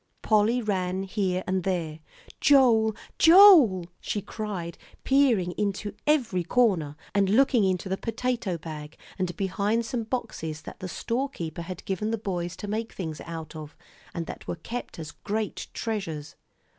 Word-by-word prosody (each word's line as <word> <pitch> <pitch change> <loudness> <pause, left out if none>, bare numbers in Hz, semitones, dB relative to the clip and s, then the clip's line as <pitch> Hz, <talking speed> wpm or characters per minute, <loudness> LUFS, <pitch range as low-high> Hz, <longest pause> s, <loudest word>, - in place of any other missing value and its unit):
Polly 220 +3 +3
ran 190 -2 -1
here 190 -2 -1
and 185 -1 -1
there. 165 -4 -2 0.4
"Joel 235 -6 +5 0.2
Joel!" 325 - +8
she 210 - -2
cried, 200 -4 -5 0.2
peering 250 -10 +3
into 205 0 -2
every 245 - +2
corner, 175 -8 +2 0.2
and 200 -1 +2
looking 240 +1 +4
into 190 0 0
the 190 0 -1
potato 230 -5 -2
bag 155 -1 -8 0.2
and 180 -2 -2
behind 205 +3 0
some 230 -1 -3
boxes 160 -10 -4
that - - -10
the 185 - -5
storekeeper 230 - -3
had 180 +2 -7
given 195 +3 -2
the 225 - 0
boys 180 -4 -3
to 205 - -7
make 220 +2 -3
things 160 -5 -5
out 160 -1 -7
of, 155 -1 -9 0.3
and 170 - -4
that - - -9
were - - -2
kept 235 +9 -7
as 160 -1 -7
great 215 0 -4
treasures. 165 -10 -4
195 Hz, 150 wpm, -27 LUFS, 175-225 Hz, 0.4 s, Joel